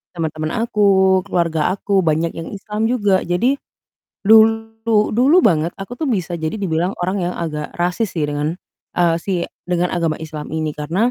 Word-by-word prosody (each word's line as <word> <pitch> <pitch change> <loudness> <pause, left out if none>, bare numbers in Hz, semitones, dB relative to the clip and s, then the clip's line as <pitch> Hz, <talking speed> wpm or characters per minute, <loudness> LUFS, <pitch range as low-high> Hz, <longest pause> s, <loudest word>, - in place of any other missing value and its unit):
teman-teman 155 -2 -3
aku, 190 -4 +3
keluarga 170 -4 +1
aku, 200 0 0
banyak 160 +1 +1
yang 165 - -6
Islam 210 +2 -2
juga 205 -6 +2
jadi 220 +11 +1 0.7
dulu 225 0 +4
dulu 270 +9 +5
banget 165 -4 +3
aku 195 +5 -6
tuh 315 - -1
bisa 180 -6 -1
jadi 160 0 -3
dibilang 175 -2 0
orang 185 +2 -1
yang - - -6
agak 150 -3 -4
rasis 180 +4 -1
sih, 160 - 0
dengan, 145 +2 -2 0.4
eee, 170 -2 +3
si 185 -3 -1 0.2
dengan 180 0 0
agama 165 -3 0
Islam 155 -1 -7
ini 155 -1 -1
karena 175 +11 0
180 Hz, 160 wpm, -19 LUFS, 160-210 Hz, 0.7 s, dulu